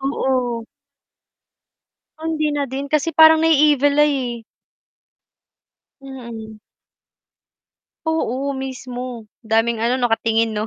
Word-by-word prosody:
Oo. 255 -4 -1 1.5
Ay, 320 +1 -5
hindi 305 -1 0
na 290 -1 -1
din 275 +2 -5
kasi 305 +2 0
parang 320 0 +6
nai-evil 295 -2 +4
eye 260 -5 0
eh. 225 - -23 1.6
Mm. 235 -5 -9 1.5
Oo, 280 -4 -1
mismo. 255 -3 -6 0.2
Daming 225 0 0
ano 240 +3 +1
nakatingin 225 -2 +1
'no? 210 +1 -3
260 Hz, 95 wpm, -20 LUFS, 235-290 Hz, 1.6 s, parang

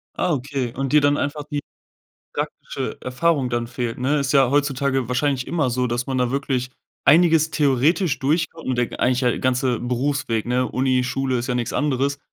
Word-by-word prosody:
Ah, 175 - 0
okay, 135 -3 -3
und 135 +1 -2
dir 150 - +6
dann 145 0 +3
einfach 145 +1 -2
die 145 -1 -1 0.7
praktische - - -4
Erfahrung 130 +1 0
dann 120 -1 -1
fehlt, 120 -1 -4
ne? 140 +4 +1
Ist 135 -1 -1
ja 135 -3 +4
heutzutage 140 -3 +1
wahrscheinlich 130 0 0
immer 155 -7 0
so, 125 +1 0
dass 120 +1 -2
man 130 -1 -1
da 125 -1 +1
wirklich 130 -2 -1 0.3
einiges 160 0 +5
theoretisch 150 +3 +2
durchkommt 160 +3 -1
und 130 - 0
der 120 -1 -2
eigentlich 125 0 +2
ja 125 -3 +1
ganze 125 -1 +1
Berufsweg, 125 -2 -1
ne? 125 +1 +1
Uni, 130 -1 +1
Schule 130 0 -1
ist 120 - -3
ja 125 - 0
nichts 120 -2 -2
anderes, 140 -1 0
135 Hz, 185 wpm, -22 LUFS, 125-145 Hz, 0.7 s, dir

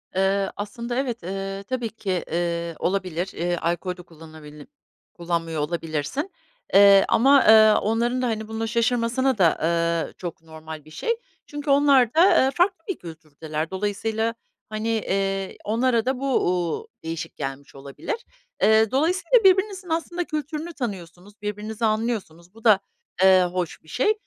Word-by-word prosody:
Eee, 195 +1 +1
aslında 235 +4 -5
evet, 240 -7 -2
eee, 195 +1 -5
tabii 245 +1 -3
ki, 190 -5 -3
eee, 170 0 -2
olabilir. 185 -1 -1
Eee, 175 0 -1
alkol 175 +2 -2
de - - -10
kullanabili 155 -2 -13 0.5
kullanmıyor 165 -3 -2
olabilirsin, 165 - -3 0.4
eee, 200 0 +7
ama, 275 +3 +5
eee, 220 0 +8
onların 235 +4 0
da, 250 - 0
hani, 220 -2 -3
buna 225 0 -3
şaşırmasına 240 +2 +1
da, 175 -3 +5
aaa, 170 0 0
çok 175 -3 -7
normal 160 -1 -10
bir 155 - -16
şey. 310 - -2 0.4
Çünkü 290 0 -6
onlar 275 -4 +4
da, 335 -4 +5
eee, 265 - +1
farklı 355 -1 +1
bir 385 - -2
kültürdeler. 160 -1 -6
Dolayısıyla, 220 +3 -1 0.4
hani, 215 +1 -4
eee, 195 -3 -1
onlara 230 +1 +1
da 260 0 -1
bu, 275 - -3 0.2
uuu, 180 - -1 0.2
değişik 165 0 -5
gelmiş 140 0 -6
olabilir. 140 - -5 0.5
Eee, 220 0 +4
dolayısıyla 350 - +2
birbirinizin 380 -1 +3
aslında 340 +2 -2
kültürünü 310 +1 -5
tanıyorsunuz. 200 - -7
Birbirinizi 210 +2 -3
anlıyorsunuz. 215 -6 -2
Bu 225 0 -17
da, 215 -4 +6 0.4
eee, 185 -1 +7
hoş 180 -2 -3
bir - - -23
şey 340 - +1
205 Hz, 145 wpm, -24 LUFS, 170-245 Hz, 0.5 s, eee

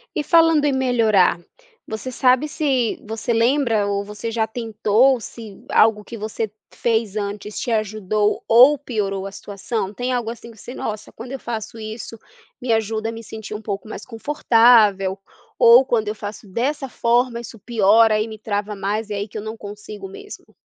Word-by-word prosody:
E, 295 - 0
falando 330 -3 +4
em 285 - +2
melhorar, 225 -9 +3 0.5
você 220 +4 -5
sabe 255 +3 +3
se 265 -7 0
você 225 +2 -3
lembra 230 -3 +2
ou 200 0 -1
você 210 +2 -6
já 225 -1 0
tentou, 225 +2 +2
se 220 -4 -10
algo 215 -1 +4
que 230 +2 -9
você 215 0 -4 0.2
fez 225 -3 0
antes 205 0 -4
te 240 - -3
ajudou 215 -1 0
ou 255 +6 +7
piorou 200 -7 -3
a 195 - -6
situação? 205 +1 -5
Tem 250 +4 -3
algo, 240 -2 -1
assim, 235 0 -9
que 225 - -18
você: 245 - -9
"Nossa, 215 -1 -5
quando 240 +3 -9
eu 270 - -5
faço 225 -1 -6
isso, 220 +1 -7 0.4
me 240 -2 +1
ajuda 220 0 -1
a - - -3
me 230 0 -9
sentir 220 0 -8
um 215 - -6
pouco 205 0 -5
mais - - -8
confortável" 225 -6 +3 0.4
ou: 240 +3 +7
"Quando 220 -5 0
eu 215 - -3
faço 210 +1 -8
dessa 265 +7 -2
forma, 240 0 +1
isso 235 -1 -9
piora 220 0 +4
e 215 - -1
me 220 -1 -8
trava 210 0 -3
mais, 205 +2 -3
e - - -3
é 205 - -2
aí 205 - -3
que 215 - -8
eu - - -4
não 220 +1 -6
consigo 205 -1 -9
mesmo"? 410 - -12
220 Hz, 185 wpm, -21 LUFS, 210-240 Hz, 0.5 s, ou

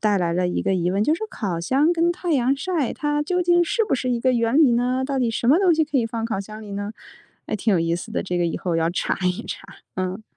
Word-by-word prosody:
带 210 -2 +2
来 175 -3 0
了 180 +1 0
一 - - -1
个 195 - +1
疑 175 -1 0
问， 200 +3 +1
就 305 - +2
是 335 - -6
说 440 - -4
烤 180 - -3
箱 280 - +2
跟 340 0 +2
太 350 -1 -2
阳 265 -1 +2
晒， 330 -5 -1
它 295 0 -1
究 360 +4 0
竟 345 0 +4
是 450 +6 +1
不 410 - 0
是 255 -1 -2
一 240 - 0
个 255 +1 +2
原 235 +2 +1
理 295 -6 +6
呢？ 250 +2 +1
到 275 -1 -2
底 240 -3 +1
什 230 - -2
么 300 - +6
东 370 -4 +4
西 315 - +2
可 290 -3 -1
以 230 - +1
放 225 0 -4
烤 220 -4 -2
箱 215 +2 -9
里 205 - -9
呢？ 205 +2 -4 0.5
哎， - - -3
挺 215 +2 0
有 - - +3
意 165 0 0
思 175 +6 -6
的， - - -2
这 180 -2 -2
个 175 - +1
以 165 - -2
后 175 -3 -2
要 165 0 +1
查 175 - -1
一 180 0 -1
查， - - -7 0.3
嗯。 185 +3 -3
235 Hz, 320 characters per minute, -23 LUFS, 190-295 Hz, 0.5 s, 理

